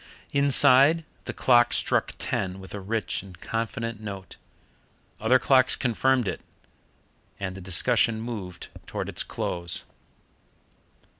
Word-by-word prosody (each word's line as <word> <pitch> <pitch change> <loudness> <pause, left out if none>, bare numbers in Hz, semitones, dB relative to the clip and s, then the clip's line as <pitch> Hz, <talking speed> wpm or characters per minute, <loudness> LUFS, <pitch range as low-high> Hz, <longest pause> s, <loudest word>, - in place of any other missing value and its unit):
Inside, 140 +2 +5 0.2
the - - -3
clock 120 -2 +4
struck - - 0
ten 95 0 -2
with 95 - -11
a 105 - -5
rich 110 +3 -2
and 90 -2 -14
confident 115 0 -4
note. 100 -3 -8 0.8
Other 110 +4 +4
clocks 130 +1 +4
confirmed 125 -1 +1
it, - - -3 1.0
and 95 -2 -4
the 95 - -9
discussion 110 +5 +2
moved 105 -6 -7 0.2
towards - - -4
its - - -3
close. 85 -1 -2
115 Hz, 120 wpm, -26 LUFS, 95-130 Hz, 1.0 s, Inside